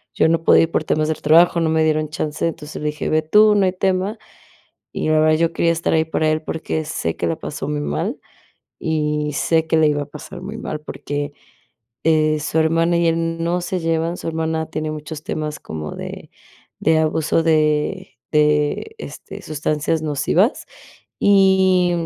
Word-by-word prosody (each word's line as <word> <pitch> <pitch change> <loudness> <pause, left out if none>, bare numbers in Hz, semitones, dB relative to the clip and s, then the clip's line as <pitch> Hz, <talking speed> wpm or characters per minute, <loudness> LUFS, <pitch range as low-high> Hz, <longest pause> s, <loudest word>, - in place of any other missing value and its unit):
yo - - +3
no 165 0 +1
podía - - +6
ir 165 - -2
por - - 0
temas 155 0 +1
del 155 - -3
trabajo, 170 +3 +5
no 160 - +1
me 160 0 +2
dieron 155 -1 0
chance, 155 -1 -3
entonces 150 -2 -6
le 150 - -2
dije: 150 +1 -4
"Ve 155 - +2
tú, 210 +6 +5
no 200 - +3
hay 185 - +2
tema", 190 +3 -1 0.7
y - - -2
la 155 - +4
verdad 155 0 +4
yo 165 0 +1
quería 170 0 +2
estar 165 0 -1
ahí 160 0 +3
para 155 -1 0
él 155 0 0
porque 160 0 -3
sé 80 - -3
que - - -2
la 80 - -1
pasó - - -6
muy 75 0 -2
mal, 75 +1 -3 0.6
y 150 -1 -1
sé 160 +2 +1
que 160 - +2
le 155 -1 +4
iba 145 -1 0
a - - -10
pasar 150 - -10
muy 205 +4 -7
mal 155 -9 -5
porque 145 -1 -5 0.7
eh, 155 -1 +3
su 155 +2 -1
hermana 165 +2 +2
y 170 - +2
él 165 0 0
no 175 +1 0
se 180 0 -2
llevan, 165 +1 -1
su - - -8
hermana 160 0 -2
tiene 155 0 -3
muchos 155 0 -7
temas 150 -1 -4
como 75 -1 -6
de - - -8 0.5
de 160 0 +3
abuso 160 +1 +1
de 155 +4 +1 0.2
de, 150 - +1
este, - - -9
sustancias 155 +1 -1
nocivas, 155 - +1 0.5
y 190 -2 +4
160 Hz, 190 wpm, -20 LUFS, 150-165 Hz, 0.7 s, podía